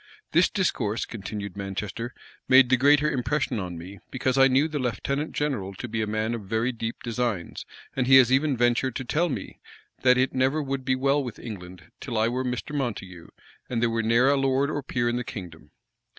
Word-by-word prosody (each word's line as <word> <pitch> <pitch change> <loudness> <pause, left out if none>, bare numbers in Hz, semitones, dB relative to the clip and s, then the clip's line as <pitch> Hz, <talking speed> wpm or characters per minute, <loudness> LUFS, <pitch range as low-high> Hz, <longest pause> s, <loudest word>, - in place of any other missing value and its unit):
"This 170 +3 +4
discourse," 120 - -1
continued 100 -2 -6
Manchester, 100 +4 -4 0.4
"made 130 -1 +7
the 130 - +5
greater 145 +3 +4
impression 130 -2 -1
on 90 -3 -5
me, 95 +4 -10
because 130 0 -1
I 135 0 +6
knew 135 +4 +3
the 155 -2 -3
lieutenant 140 +5 -2
general 115 -10 -2
to 120 - -6
be 110 -1 -2
a 110 - -1
man 110 +2 -1
of 115 - -4
very 110 +5 -1
deep 115 -1 -5
designs; 115 -6 -3 0.3
and 125 -2 0
he 135 - +7
has 130 -2 +7
even 135 0 +2
ventured 120 +1 +1
to 130 - -4
tell 165 +7 +1
me, 135 - -6 0.4
that 125 -1 +5
it 130 +1 +1
never 130 +4 +2
would 135 -2 -3
be 130 0 +1
well 140 +2 +2
with 120 -4 -6
England 90 -6 -9
till 120 -4 -4
I 110 +1 +3
were 125 +2 -2
Mr. 125 +3 -4
Montague, 95 -10 -4 0.4
and 120 - -1
there 120 0 +2
were 115 0 0
ne'er 115 +4 +4
a 140 - +2
lord 135 +2 +1
or 145 - -2
peer 120 -3 -1
in 120 0 0
the 125 - -2
kingdom." 90 -8 -9
125 Hz, 210 wpm, -26 LUFS, 110-135 Hz, 0.4 s, made